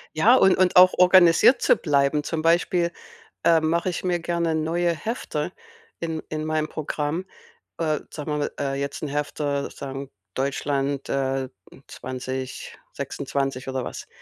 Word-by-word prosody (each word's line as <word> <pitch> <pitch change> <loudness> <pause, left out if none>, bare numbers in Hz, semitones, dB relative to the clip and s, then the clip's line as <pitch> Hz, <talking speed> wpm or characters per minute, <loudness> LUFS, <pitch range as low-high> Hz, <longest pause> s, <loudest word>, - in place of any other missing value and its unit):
Ja, 225 +11 +6
und 190 -6 +5
und 185 -1 +2
auch 185 0 +8
organisiert 180 +6 +6
zu - - +5
bleiben, 145 -1 +1
zum 160 0 -3
Beispiel, 170 +1 +2 0.5
äh, 165 -1 +5
mache 170 +3 0
ich 175 - -5
mir 175 -2 0
gerne 170 -1 -1
neue 165 +2 0
Hefter 225 +9 -4 0.5
in 160 -2 -3
in 155 0 -3
mein 155 -1 0
Programm. 155 +3 -3 0.5
Äh, 155 -3 0
sagen 150 0 -5
wir 150 - 0
mal, 145 - -2
äh, 140 -1 -1
jetzt 140 0 -4
'n 150 - -3
Hefter 145 0 -2
sagen 135 0 -7 0.2
Deutschland, 140 0 -1
äh, 135 -1 -1 0.4
2026 130 +1 -5
oder 130 -2 -3
was, - - -7
155 Hz, 145 wpm, -24 LUFS, 140-170 Hz, 0.5 s, auch